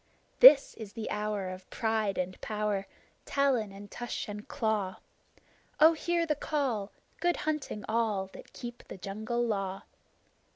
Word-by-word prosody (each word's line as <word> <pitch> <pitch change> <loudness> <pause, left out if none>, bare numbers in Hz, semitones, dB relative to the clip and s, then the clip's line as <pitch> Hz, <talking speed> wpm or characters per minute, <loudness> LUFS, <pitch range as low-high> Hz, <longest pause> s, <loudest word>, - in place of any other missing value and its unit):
This 305 - +9
is 215 -3 -8
the 225 -2 -5
hour 210 -2 -2
of 185 0 -9
pride 220 -4 0
and 185 0 -3
power, 210 -2 -1 0.4
Talon 260 -7 +1
and 200 +1 -11
tush 240 0 -4
and 210 0 -7
claw. 215 -7 -1 0.8
Oh, 315 +2 +8
hear 340 +1 0
the 310 - +1
call! 265 -9 -1 0.3
Good 350 +1 +2
hunting 300 -9 -2
all 220 -4 +1
That - - -12
keep 240 0 -8
the - - -8
Jungle 220 +6 -2
Law! 195 -4 -2
220 Hz, 140 wpm, -30 LUFS, 200-265 Hz, 0.8 s, This